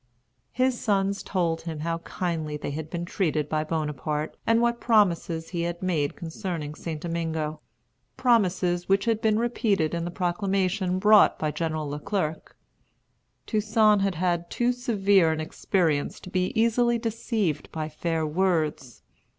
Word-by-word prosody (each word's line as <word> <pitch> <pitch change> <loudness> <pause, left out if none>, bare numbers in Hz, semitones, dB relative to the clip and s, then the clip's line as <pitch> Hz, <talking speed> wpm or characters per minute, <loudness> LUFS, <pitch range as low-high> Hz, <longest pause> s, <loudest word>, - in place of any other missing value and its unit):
His 255 0 +1
sons 200 -2 +1
told 170 -4 -1
him 160 -3 -5
how 165 +1 -2
kindly 165 -3 -3
they 145 - -5
had 155 +1 -5
been 170 0 -4
treated 155 -5 -1
by 155 0 0
Bonaparte, 155 -1 -2
and 230 0 +4
what 235 0 +1
promises 175 -7 +2
he 170 -2 -3
had 170 +1 -3
made 160 -6 0
concerning 165 -3 -5
St. 155 0 -5
Domingo, 160 -2 -3 0.6
promises 185 -8 +2
which 195 +2 +3
had 225 -1 +1
been 215 -1 +3
repeated 215 -8 +1
in 170 -1 -1
the 175 - -3
proclamation 185 +1 0
brought 210 +2 +6
by 155 -1 -1
General 155 -1 -2
Le 145 +1 -4
Clerc. 170 -4 -3 0.9
Toussaint 215 -1 +3
had 195 -2 0
had 175 0 0
too 240 0 +1
severe 200 -8 +3
an 160 - -2
experience 155 -1 0
to 180 - -10
be 185 0 0
easily 235 +1 +3
deceived 225 - -2
by 155 -1 -3
fair 160 +1 -2
words. 155 -6 -1
175 Hz, 150 wpm, -26 LUFS, 160-205 Hz, 0.9 s, brought